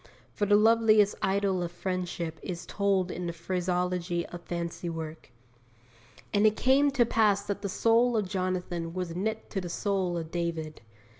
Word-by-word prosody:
For 205 - -1
the 205 - +5
loveliest 215 -1 +5
idyll 195 -1 +1
of 170 -1 -3
friendship 175 -2 -4
is 175 -2 -5
told 195 -2 0
in 180 -1 -4
the 170 - -3
phraseology 180 0 -1
of 175 - -9
fancy 170 0 -4
work. 160 -3 -6 1.0
'And 205 +1 +5
it 215 - +1
came 275 +3 +4
to 270 -4 +3
pass 210 -3 +2
that 200 0 -4
the 200 - -3
soul 230 +4 +3
of 210 -3 0
Jonathan 180 -3 -3
was 180 -2 -3
knit 220 +4 -3
to 195 - -2
the 175 - -6
soul 190 -1 -1
of 160 -1 -5
David.' 165 -4 -3
185 Hz, 165 wpm, -29 LUFS, 175-205 Hz, 1.0 s, the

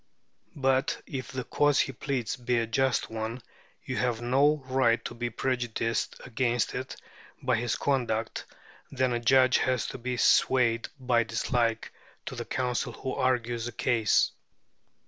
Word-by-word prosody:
But 135 -1 +1
if 130 -3 -5
the 130 -1 -3
cause 145 +3 +3
he - - -2
pleads 130 -2 -2
be 125 -1 -1
a 115 - +1
just 125 +2 0
one, 115 +2 -4 0.4
you - - -3
have 120 -3 0
no 135 +5 +3
more 135 - -17
right 130 -3 +2
to - - -4
be 120 0 -3
prejudiced 120 -1 -2
against 120 -1 0
it 130 +1 -5 0.5
by - - +2
his 120 0 -1
conduct 115 -5 -1 0.5
than 130 -2 +1
a 120 - 0
judge 130 +2 +4
has 130 -2 +1
to - - -7
be 125 +1 -3
swayed 120 -2 +3
by 125 -2 +2
dislike 115 0 -1 0.3
to 130 - -5
the 120 -1 -5
counsel 125 -3 -2
who 130 +3 -4
argues 120 -2 0
a - - -5
case. 115 -2 +2
125 Hz, 155 wpm, -28 LUFS, 115-130 Hz, 0.5 s, judge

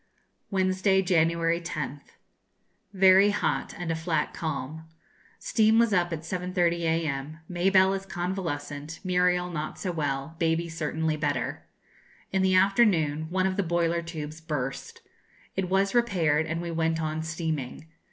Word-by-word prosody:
Wednesday, 190 0 +2
January 170 -1 +2
10th. 150 -4 -5 0.8
Very 190 +1 +6
hot, 205 - -1
and 175 -2 -3
a - - 0
flat 160 -2 -1
calm. 155 0 -4 0.5
Steam 220 0 +3
was 230 -2 +4
up 175 -2 +2
at 160 -2 -3
7.30 180 0 0
a.m. 155 -3 -2
Mabelle 190 +2 +3
is 195 0 -4
convalescent; 165 -5 -4
Muriel 180 -1 +1
not 155 -2 -4
so 185 - -3
well; 145 -2 -3
Baby 165 0 +1
certainly 160 -1 -2
better. 145 -3 -2 0.6
In 190 - +1
the 190 0 +3
afternoon 185 -6 +3
one 185 +1 +1
of 190 0 -1
the - - +3
boiler 170 -1 0
tubes 155 -2 -7
burst. 145 -5 -4 0.5
It 185 -1 -1
was 195 +1 +2
repaired, 165 -10 +2
and 165 +1 -3
we 170 - -4
went 165 0 0
on 155 0 -2
steaming. 160 -4 -4
170 Hz, 140 wpm, -27 LUFS, 155-185 Hz, 0.8 s, Very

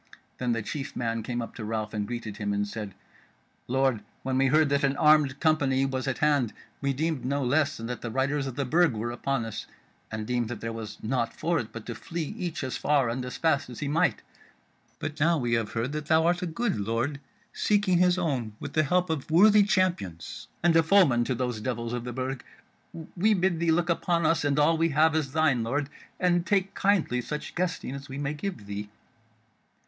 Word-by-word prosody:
Then 125 -1 +1
the 115 -1 -2
chief 135 +5 -5
man 115 -1 -1
came 120 +2 -3
up 115 - -9
to 110 - -7
Ralph 110 0 -3
and 105 -1 -2
greeted 115 -3 -5
him 100 -1 -1
and 100 0 0
said: 105 -2 -6 0.7
"Lord, 130 -3 +1 0.2
when 130 0 -1
we 135 - +4
heard 155 +2 +4
that 140 0 +1
an 140 0 +1
armed 150 -3 +4
company 135 -4 +2
was 130 0 -2
at 135 - -1
hand 140 -7 +2 0.3
we 140 0 +1
deemed 150 0 -1
no 140 +2 0
less 145 +3 +2
than 115 - -6
that 125 +1 -5
the 120 - -4
riders 135 +3 0
of 130 - -5
the 140 - -1
Burg 165 +2 +3
were 115 +2 -3
upon 120 0 -1
us, 110 - -6 0.4
and 110 0 -4
deemed 120 0 0
that 120 -3 -5
there 115 +1 -4
was 110 -2 -7
nought 115 0 -1
for 170 0 0
it 110 - -5
but 115 -2 -8
to 120 - -4
flee 165 - -5
each 175 -8 -4
as 130 - -3
far 140 -5 +2
and 125 +2 -2
as 125 - -6
fast 160 -6 +1
as 120 - -8
he 145 - -2
might. 165 +5 +1 0.7
But 155 +1 -5
now 165 +2 +3
we 120 -4 -1
have 115 -1 0
heard 115 +4 -1
that 150 0 -4
thou 160 +1 +4
art 175 +1 +2
a 180 - -2
good 200 - -1
lord 115 +7 -1 0.3
seeking 205 -4 +2
his 180 0 +4
own 135 -11 -1
with 145 - -7
the 155 - +4
help 180 +3 +1
of 155 -2 -3
worthy 205 +6 +7
champions, 180 - -1 0.2
and 170 -1 +4
a 165 - +7
foeman 160 -9 +4
to 130 - -1
those 120 -3 -2
devils 115 -1 -3
of 120 0 -3
the 125 - -4
Burg, 130 +1 -4 0.7
we 210 +4 +3
bid 180 -2 +1
thee 170 0 +1
look 175 +1 +2
upon 170 0 +1
us 165 0 +2
and 145 -1 +1
all 160 +2 +4
we 165 0 +3
have 155 +2 +4
as 150 -4 -1
thine, 155 -6 +3
lord, 135 +5 -1 0.3
and 175 -1 +2
take 195 -1 +1
kindly 190 -11 +1
such 150 +5 -5
guesting 180 -6 -2
as 140 0 -8
we 135 - -6
may 145 +1 -2
give 150 - -5
thee." 100 +1 -5
140 Hz, 220 wpm, -27 LUFS, 120-160 Hz, 0.7 s, worthy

